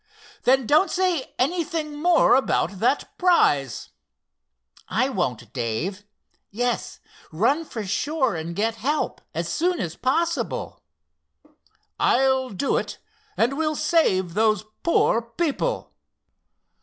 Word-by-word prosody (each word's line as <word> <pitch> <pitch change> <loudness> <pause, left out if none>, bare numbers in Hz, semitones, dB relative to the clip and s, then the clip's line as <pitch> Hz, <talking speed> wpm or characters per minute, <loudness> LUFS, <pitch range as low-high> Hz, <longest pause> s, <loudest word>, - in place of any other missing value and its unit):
"Then 265 0 +4
don't 310 - +4
say 360 -6 -1
anything 310 0 -1
more 345 0 +5
about 200 -7 +1
that 250 +6 0
prize." 145 - +2 1.0
"I 250 +7 +1
won't, 125 - -3
Dave. 145 - -3 0.4
Yes, 245 +3 -2 0.3
run 255 - +1
for 220 -7 -6
shore, 265 - 0
and 165 +1 -5
get 225 +3 -1
help 290 +7 -1
as 170 +1 -2
soon 350 - 0
as 165 -1 -3
possible." 335 +6 -1 1.2
"I'll 265 0 +2
do 225 +7 0
it—and 240 +4 -3
we'll 310 -1 0
save 190 - +2
those 215 +1 +2 0.2
poor 285 -8 +2
people. 300 - -2
255 Hz, 105 wpm, -24 LUFS, 190-310 Hz, 1.2 s, more